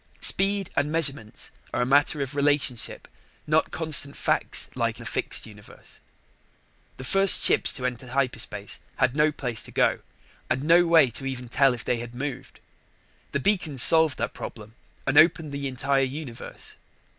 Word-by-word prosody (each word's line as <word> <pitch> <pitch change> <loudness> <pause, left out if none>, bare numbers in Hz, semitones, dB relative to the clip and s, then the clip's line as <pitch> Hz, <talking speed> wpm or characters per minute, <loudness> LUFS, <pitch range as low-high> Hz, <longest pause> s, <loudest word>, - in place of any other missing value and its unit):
Speed 195 -1 +2
and 145 +1 0
measurements 140 -9 -2 0.2
are - - 0
a - - -1
matter 145 +2 +2
of 135 +1 -8
relationship, 140 -4 0 0.4
not - - +1
constant 155 -3 +2
facts - - -1
like - - -2
the - - -11
fixed - - -2
universe. 105 -2 -14 1.0
The 130 - -8
first 195 +7 +5
ships - - +4
to 125 - -4
enter 125 0 -4
hyperspace 120 -6 -3 0.2
had 125 - 0
no 150 +1 +3
place 125 -6 -2
to - - -7
go - - +1 0.5
and 135 - -1
no 170 +3 +4
way 160 -7 +5
to 135 +4 -4
even 125 -2 -6
tell 135 +1 +3
if 120 - -9
they 125 - 0
had 120 0 -9
moved. 135 +2 -7 0.7
The 140 - -1
beacons 155 -6 +2
solved 160 -4 +3
that - - -3
problem 110 -1 -9 0.3
and 135 - +4
opened 160 -2 +3
the 140 0 -4
entire 135 +1 0
universe. 135 -2 -6
140 Hz, 160 wpm, -25 LUFS, 125-155 Hz, 1.0 s, first